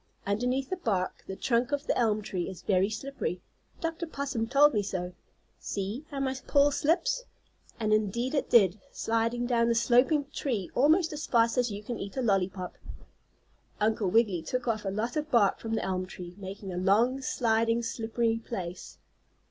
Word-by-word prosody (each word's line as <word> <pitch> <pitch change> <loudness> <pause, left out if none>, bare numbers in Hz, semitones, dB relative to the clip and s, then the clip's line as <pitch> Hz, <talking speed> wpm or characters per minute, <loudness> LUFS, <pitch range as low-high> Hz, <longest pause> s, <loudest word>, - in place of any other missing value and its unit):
"Underneath 250 - -1
the 375 - -1
bark 195 - -2
the 190 - -5
trunk 240 +4 0
of 285 0 -1
the - - +1
elm 215 -3 +1
tree 180 -2 -3
is 185 -2 -9
very 195 0 +2
slippery. 220 -5 -4 0.4
Dr. 330 0 -3
Possum 275 -7 -3
told 285 +3 +5
me 210 - +2
so. 180 -2 -4 0.5
See 205 +8 -4
how 280 - -5
my 265 -1 0
paw 285 0 +4
slips!" 340 - +1 0.5
And 215 -1 +1
indeed 215 +5 0
it 285 - 0
did, 205 -4 +5
sliding 230 +2 0
down 235 -1 +2
the 235 - +2
sloping 255 +5 +3
tree 225 -13 -2
almost 315 +5 +3
as 300 +1 -5
fast 230 -1 +3
as 245 -2 +1
you 205 +1 -6
can 235 +2 -5
eat 200 +5 -7
a 260 - 0
lollypop. 190 -3 -1 1.0
Uncle 215 -2 +1
Wiggily 205 -4 +3
took 250 +9 -3
off 220 -3 -1
a - - 0
lot 215 +5 -2
of 305 0 -2
bark 220 -7 +3
from 225 0 -3
the - - -1
elm 185 -1 -2
tree, 180 -1 -9
making 195 0 -7
a - - -4
long, 225 +8 +3
sliding, 230 -2 +1
slippery 230 0 -1
place. 185 -6 -6
230 Hz, 180 wpm, -29 LUFS, 200-260 Hz, 1.0 s, told